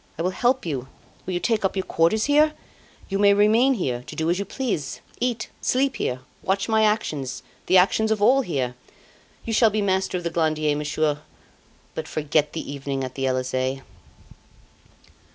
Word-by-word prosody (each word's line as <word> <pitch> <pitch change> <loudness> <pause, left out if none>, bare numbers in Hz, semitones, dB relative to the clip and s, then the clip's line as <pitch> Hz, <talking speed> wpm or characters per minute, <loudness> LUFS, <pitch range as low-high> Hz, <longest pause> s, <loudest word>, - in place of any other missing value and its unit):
I 165 - -2
will 180 - +1
help 245 +4 +1
you. 135 -6 -3 0.4
Will 185 - -2
you - - 0
take 225 +2 0
up 195 - 0
your 190 - -1
quarters 170 +7 +2
here? 300 +2 +4 0.5
You 195 0 -2
may 200 0 +6
remain 225 +6 +4
here 125 - -2
to - - -8
do 160 +1 0
as 180 - 0
you 200 - -2
please. 210 - -3 0.2
Eat 240 -2 -1
sleep 265 -1 +1
here 125 -10 -2 0.2
watch 195 +1 0
my 220 -1 +3
actions 150 - -1 0.2
the 185 - +5
actions 200 +4 +3
of 220 -1 +1
all 255 +6 +5
here. 135 - -2 0.7
You 225 - -2
shall 225 0 +5
be 215 +1 -1
master 190 -2 0
of 175 - -6
the 170 - -2
Glandier, 155 -2 +1
Monsieur; 150 0 0 0.7
but 160 0 -5
forget 150 -1 0
the 160 - -5
evening 135 -1 -3
at 130 -1 -5
the 135 0 -1
Elysee. 130 +1 -1
180 Hz, 180 wpm, -24 LUFS, 145-220 Hz, 0.7 s, may